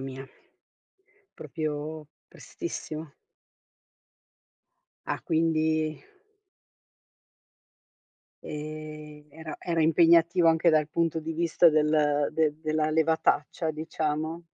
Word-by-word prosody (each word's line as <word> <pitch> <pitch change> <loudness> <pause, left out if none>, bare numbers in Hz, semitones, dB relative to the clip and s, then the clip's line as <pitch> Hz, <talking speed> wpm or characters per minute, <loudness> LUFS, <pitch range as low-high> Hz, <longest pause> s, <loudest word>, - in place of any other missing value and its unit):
mia. 135 0 -7 1.1
Proprio 155 -1 -5 0.2
prestissimo. 155 -2 -7 2.0
Ah, - - -2
quindi 160 -1 0 2.5
Ehm, 150 0 -8
era 160 +1 -8
era 170 -2 -1
impegnativa, 170 +2 +4
anche 165 +1 +4
dal 155 -1 +2
punto 165 0 -1
di 160 +1 -5
vista 170 +1 +4
del 150 -2 +2
de 155 -2 +1
della 155 0 0
levataccia, 160 0 +1
diciamo? 155 +1 -3
155 Hz, 80 wpm, -27 LUFS, 150-160 Hz, 2.5 s, impegnativa